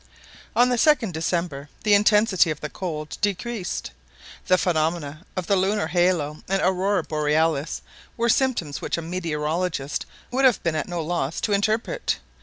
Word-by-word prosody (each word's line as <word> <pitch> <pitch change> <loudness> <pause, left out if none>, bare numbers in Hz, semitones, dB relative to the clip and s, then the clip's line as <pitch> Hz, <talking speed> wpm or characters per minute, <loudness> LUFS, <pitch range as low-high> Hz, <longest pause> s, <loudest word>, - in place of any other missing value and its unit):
On 245 +1 +5
the 245 - +1
2nd 255 -6 +3
December; 160 -3 -2
the 210 - +4
intensity 210 -3 +4
of 155 -1 -3
the 150 - -6
cold 155 -5 -5
decreased. 205 - -2 0.6
The 185 - +5
phenomena 160 -3 -1
of 185 -2 -2
the 200 - +2
lunar 195 +2 +1
halo 165 -3 +1
and 195 0 +2
Aurora 190 +1 +1
Borealis 155 0 0 0.3
were 235 0 +1
symptoms 230 - +1
which - - -2
a 170 - -4
meteorologist 165 -2 -2 0.2
would 260 +2 +1
have 255 -7 +4
been 165 -2 0
at 155 - -2
no 175 -2 -3
loss 160 -3 -2
to 210 - 0
interpret. 215 +3 0
175 Hz, 155 wpm, -24 LUFS, 155-205 Hz, 0.6 s, On